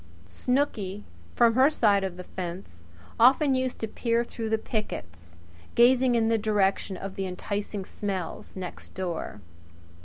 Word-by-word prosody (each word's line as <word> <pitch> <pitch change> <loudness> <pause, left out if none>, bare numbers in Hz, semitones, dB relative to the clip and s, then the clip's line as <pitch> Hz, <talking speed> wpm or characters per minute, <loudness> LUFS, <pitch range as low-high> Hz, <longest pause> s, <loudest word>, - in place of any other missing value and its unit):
Snooky, 210 - -1 0.3
from 235 -1 +5
her 260 +4 +6
side 205 -9 +3
of 185 -2 -4
the 180 - -7
fence, 170 - -7 0.3
often 265 +4 +6
used 255 -1 -1
to 220 - -3
peer 230 +1 0
through 225 -2 -5
the 220 - +2
pickets, 85 - -5 0.4
gazing 250 +1 +5
in 225 -1 +3
the 225 0 +2
direction 200 -2 +1
of 195 +1 -6
the 195 0 -3
enticing 200 +2 -4
smells 195 -4 -5
next 185 -2 -8
door. 175 - -4
205 Hz, 145 wpm, -27 LUFS, 185-235 Hz, 0.4 s, her